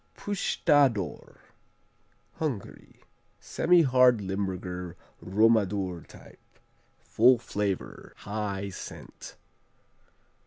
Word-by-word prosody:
Pusztador 140 - 0 1.0
Hungary 140 - -6 0.4
Semihard, 130 -9 +4
Limburger 95 -2 -4 0.3
Romadur 100 -4 +1
type. - - -16 0.6
Full 125 +3 +4
flavor, 105 -4 -4
high 100 -1 -4
scent. 95 - -10
105 Hz, 55 wpm, -27 LUFS, 95-125 Hz, 1.0 s, Semihard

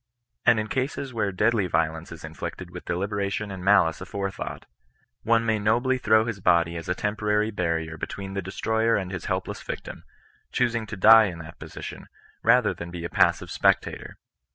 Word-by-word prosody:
And 120 -2 +6
in 110 - -2
cases 130 +1 -3
where 110 -3 0
deadly 105 +1 +2
vio 80 -2 +1
lence 80 +1 -10
is 85 - -10
inflicted 80 +3 -7
with 90 0 -9
deliberation 100 +2 -2
and 95 -2 -7
malice 90 -5 +4
afore 100 -1 -3
thought, - - -7 0.6
one 115 0 +2
may 110 -1 +1
nobly 120 +5 +2
throw 110 -1 +4
his 115 -4 -4
body 85 -2 +3
as 85 +2 -6
a 90 - +1
temporary 105 +1 0
barrier 80 -4 -2
between 95 +4 -6
the 100 - -2
destroyer 110 +4 0
and 95 -2 -2
his 90 -3 -5
helpless - - -3
victim, - - -7 0.5
choosing 115 -3 0
to 105 - -6
die 110 +3 +8
in 90 -4 -4
that 80 0 -11
position, - - -8 0.3
rather 120 0 +4
than 85 - -8
be 85 -1 -7
a - - -3
passive - - +2
spectator. - - 0
100 Hz, 180 wpm, -25 LUFS, 90-110 Hz, 0.6 s, die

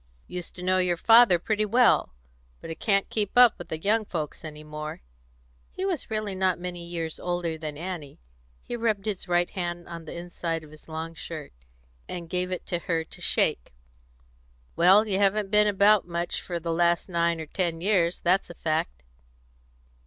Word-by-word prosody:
"Used 180 -1 -6
to 180 - -8
know 185 0 +2
your 180 -1 +1
father 225 -1 +7
pretty 215 +5 0
well; 215 - +3 0.4
but - - -8
I - - -1
can't 195 +4 +1
keep 210 0 -1
up 245 -4 +7
with 175 - -9
the 160 - -3
young 215 +7 +1
folks 160 -7 -5
any 155 -1 -8
more." 150 - -7 0.7
He 375 - -4
was 360 -7 -2
really 215 -2 -2
not 185 -1 +1
many 175 0 -5
years 165 -2 -4
older 175 -2 -2
than 155 -2 -6
Annie; 170 -4 -6 0.4
he - - -5
rubbed 220 -4 0
his 200 -3 -3
right 175 0 +1
hand 175 -2 -4
on 170 -1 -8
the 155 - -8
inside 170 -1 -4
of 150 - -14
his 155 - -16
long 160 +1 -5
shirt, 155 -2 -8 0.6
and 170 -2 -6
gave 180 0 -1
it 185 - -4
her 170 -1 -1
to - - -13
shake. - - +1 1.0
"Well, 195 +6 +6
you 195 -2 +1
haven't 200 0 +2
been 210 0 +5
about 205 -1 +4
much 170 0 -2
for 175 -2 -4
the 165 0 -2
last 170 0 +2
nine 170 -2 +1
or 160 - -5
ten 170 0 -2
years, 180 -2 +1
that's 185 +3 +2
a 175 - -9
fact." 155 - -2
175 Hz, 180 wpm, -26 LUFS, 165-195 Hz, 1.0 s, father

